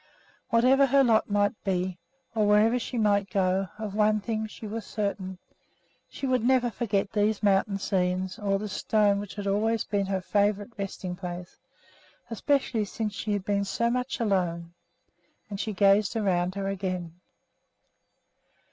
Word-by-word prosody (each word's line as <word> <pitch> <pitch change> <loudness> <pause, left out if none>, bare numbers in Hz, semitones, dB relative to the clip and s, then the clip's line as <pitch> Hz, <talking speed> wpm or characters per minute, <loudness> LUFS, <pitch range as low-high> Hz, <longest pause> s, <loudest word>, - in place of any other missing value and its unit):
Whatever 260 +4 +5
her 275 +1 +5
lot 225 -4 +3
might 205 +1 0
be, 185 -2 -1 0.3
or 215 -2 +2
wherever 215 +4 +4
she 245 +1 -5
might 205 -3 +2
go, 190 0 +1
of 215 -2 -5
one 215 0 +3
thing 220 +1 -3
she 215 - -10
was 220 +1 -4
certain, 200 -3 -3 0.7
she - - -6
would 255 -3 +1
never 250 -1 +3
forget 200 -4 -1
these 210 0 +1
mountain 195 0 +2
scenes 185 -1 -1
nor 195 -1 +1
this 205 -1 -5
stone 205 -2 +2
which 205 -1 -7
had 205 -1 -5
always 215 +3 +1
been 200 -1 -1
her 190 -1 0
favorite 205 +3 0
resting 190 -2 -5
place, 180 -1 -7 0.7
especially 235 -1 +1
since 210 +1 -4
she 210 +1 -4
had 200 -2 -2
been 200 -1 +1
so 235 +4 0
much 250 +2 -2
alone; 175 -6 -1 0.8
and 200 - -4
she 220 - -2
gazed 200 +1 +3
around 185 -4 0
her 195 -1 -2
again. 185 -3 -3
205 Hz, 155 wpm, -27 LUFS, 195-220 Hz, 0.8 s, Whatever